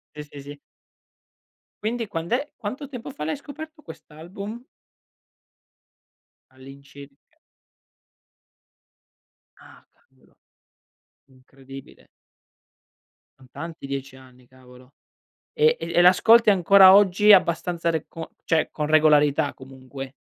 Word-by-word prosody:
Sì, 150 - -7
sì, 145 - -11
sì. 145 +1 -11 1.3
Quindi 230 +1 -3
quand'è 210 - -4
quanto 255 +8 -7
tempo 250 -2 -9
fa 150 - -8
l'hai 160 - -3
scoperto 305 +2 -12
quest'album? 200 - -11 1.9
All'incirca 140 +1 -15 2.4
Ah - - -19
cavolo. - - -32 0.9
Incredibile. 135 +1 -16 1.3
Son 130 - -18
tanti 165 +1 -9
10 135 -1 -7
anni, 130 -1 -19
cavolo. 125 0 -20 0.6
E 465 +1 +2
e - - -7
e - - +3
l'ascolti 215 +6 +5
ancora 190 0 +6
oggi 205 +1 +5
abbastanza 170 -2 +1
re 160 -2 -4
con 165 0 -9 0.2
cioè 160 -1 0
con 150 - -4
regolarità 150 -1 +2
comunque? 130 0 -11
160 Hz, 100 wpm, -23 LUFS, 135-205 Hz, 2.4 s, ancora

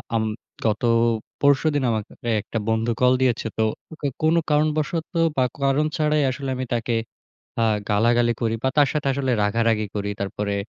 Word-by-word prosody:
আম 110 - +2 0.4
গত 110 +1 0 0.6
পরশুদিন 145 0 +3
আমাকে 110 -2 -3 0.2
এ - - +2
একটা 115 - -5
বন্ধু 110 +1 +1
কল 125 0 +5
দিয়েছে। 125 -3 +1
তো 110 - +2 0.4
কো - - -4 0.2
কোনো 160 +2 +4
কারণবশত 155 +2 +1 0.3
বা 130 - +4 0.2
কারণ 140 +2 +2
ছাড়াই। 150 -1 +2
আসলে 135 +1 -5
আমি 130 0 -3
তাকে 120 0 -1 0.7
আ - - +4 0.3
গালাগালি 120 +3 +3
করি 115 -1 +1
বা 130 - +2
তার 145 -2 +5
সাথে 150 -2 -2
আসলে 135 -1 -1
রাগারাগি 110 +1 +1
করি। 100 0 -2
তারপরে 100 +1 -2
125 Hz, 165 wpm, -23 LUFS, 110-145 Hz, 0.7 s, কল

